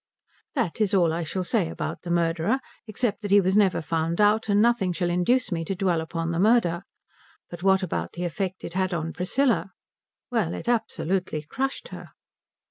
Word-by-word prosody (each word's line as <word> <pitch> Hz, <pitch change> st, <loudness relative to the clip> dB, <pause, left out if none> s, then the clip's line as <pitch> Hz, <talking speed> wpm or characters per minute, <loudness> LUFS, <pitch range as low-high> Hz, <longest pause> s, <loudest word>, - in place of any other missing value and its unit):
That 225 Hz, -, -1 dB
is 205 Hz, -2 st, +2 dB
all 170 Hz, -4 st, +3 dB
I 170 Hz, -, -2 dB
shall 185 Hz, +3 st, -3 dB
say 180 Hz, -3 st, 0 dB
about -, -, -5 dB
the 175 Hz, -, -8 dB
murderer, 170 Hz, +7 st, +1 dB, 0.3 s
except 220 Hz, +1 st, -2 dB
that 205 Hz, -, -4 dB
he 200 Hz, +1 st, +7 dB
was 190 Hz, 0 st, +1 dB
never 200 Hz, -5 st, +3 dB
found 165 Hz, +2 st, -1 dB
out; 210 Hz, +1 st, +3 dB
and 200 Hz, 0 st, +4 dB
nothing 220 Hz, -5 st, +3 dB
shall 175 Hz, 0 st, -1 dB
induce 215 Hz, +7 st, +1 dB
me 165 Hz, -1 st, -1 dB
to 195 Hz, -, -2 dB
dwell 180 Hz, -3 st, +1 dB
upon 165 Hz, +1 st, -3 dB
the 170 Hz, -, -1 dB
murder. 195 Hz, -5 st, +3 dB, 0.7 s
But 175 Hz, 0 st, -8 dB
what 190 Hz, 0 st, +3 dB
about 185 Hz, -, -3 dB
the 175 Hz, +1 st, -3 dB
effect 185 Hz, +2 st, -3 dB
it -, -, -6 dB
had 185 Hz, -1 st, 0 dB
on 165 Hz, 0 st, -3 dB
Priscilla? 190 Hz, -, 0 dB, 0.6 s
Well, 215 Hz, -9 st, 0 dB
it -, -, -7 dB
absolutely 190 Hz, -8 st, -1 dB
crushed 270 Hz, -, -3 dB
her. -, -, -10 dB
185 Hz, 190 wpm, -25 LUFS, 170-210 Hz, 0.7 s, he